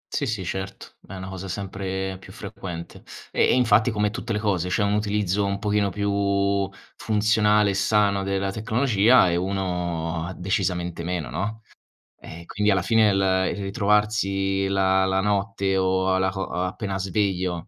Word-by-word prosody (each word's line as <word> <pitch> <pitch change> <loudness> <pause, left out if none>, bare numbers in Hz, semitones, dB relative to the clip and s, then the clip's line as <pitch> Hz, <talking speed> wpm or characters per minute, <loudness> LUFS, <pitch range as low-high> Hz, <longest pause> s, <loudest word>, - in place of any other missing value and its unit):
Sì, 145 - 0
sì, 110 -6 -2
certo, 95 +3 -5 0.2
è 95 - -8
una 95 0 -7
cosa 95 0 -7
sempre 95 0 -4
più - - -13
frequente. 85 -3 -8 0.3
E - - +2
e - - +3
infatti, 115 -2 +4
come 105 -1 +1
tutte 110 +2 -4
le 105 - 0
cose, 95 -5 0
c'è 100 +3 +1
un 100 - +1
utilizzo 105 -2 0
un 100 0 -1
pochino 105 0 0
più 100 0 0 0.3
funzionale 105 -1 +2
e - - 0
sano 100 0 +2
della 95 0 -1
tecnologia, 110 0 +3
e 85 - +1
uno 90 -2 -2
decisamente 90 -2 -2
meno, 85 -6 -3
no. 105 - -4 0.6
E 85 +1 -11
quindi, 105 +4 0
alla 95 -1 +2
fine 110 +2 +3
l 95 - +1 0.3
il 100 - -6
ritrovarsi 100 -1 +1
la 95 -1 +2
la 95 0 +1
notte 100 0 0
o 95 0 +1
alla 95 0 +2
co 95 0 -4
o 90 -1 -3
appena 95 +1 -3
sveglio 95 -3 -1
100 Hz, 165 wpm, -24 LUFS, 95-105 Hz, 0.6 s, infatti